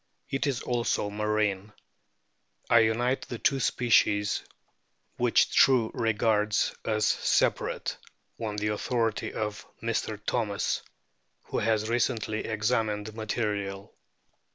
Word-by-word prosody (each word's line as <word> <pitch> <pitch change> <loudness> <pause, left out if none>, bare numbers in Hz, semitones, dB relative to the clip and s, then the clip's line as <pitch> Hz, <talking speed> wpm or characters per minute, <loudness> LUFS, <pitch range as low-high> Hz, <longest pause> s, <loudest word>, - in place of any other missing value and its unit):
It 135 +2 0
is 135 -3 -1
also 120 -4 0
marine. 105 -1 -1 1.0
I 115 - +8
unite 120 +4 +2
the 120 - -5
two 135 +4 +1
species 105 -5 +2 0.8
which - - +3
True 125 -4 +5
regards 110 -2 +1
as 110 -1 +1
separate - - +1 0.4
f - - -6
on 105 - -4
the 105 0 -1
authority 115 +1 -1
of 105 -1 -4 0.2
Mr. 115 -2 -2
Thomas,! 105 -5 0 0.7
wno - - 0
nas 110 -1 +1
recently 115 -2 0
examined 110 -1 -1
material. 105 -3 -3
110 Hz, 105 wpm, -28 LUFS, 105-115 Hz, 1.0 s, I